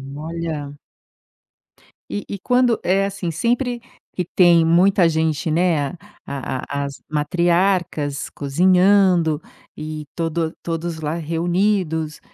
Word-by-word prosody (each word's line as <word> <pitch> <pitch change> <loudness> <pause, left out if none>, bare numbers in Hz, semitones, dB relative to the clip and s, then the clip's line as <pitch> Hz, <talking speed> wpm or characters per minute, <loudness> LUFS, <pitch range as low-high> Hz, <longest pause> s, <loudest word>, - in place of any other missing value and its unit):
Olha. 155 -2 -5 1.4
E 205 - -4
e 200 - -5
quando, 245 +2 +2
eh, 195 +2 +2
assim, 195 -4 -3
sempre 240 - -1 0.3
que 180 - -1
tem 175 -1 +5
muita 175 +2 +4
gente, 160 0 0
né, 160 -3 +2
a - - -10 0.3
a 140 +1 -4
as 140 - -5 0.2
matriarcas 170 -1 0
cozinhando, 180 +1 +3 0.3
e 155 0 -6
todo 165 -1 -1
todos 165 -1 -4
lá 155 +1 -2
reunidos. 170 -1 -1
170 Hz, 105 wpm, -21 LUFS, 155-185 Hz, 1.4 s, tem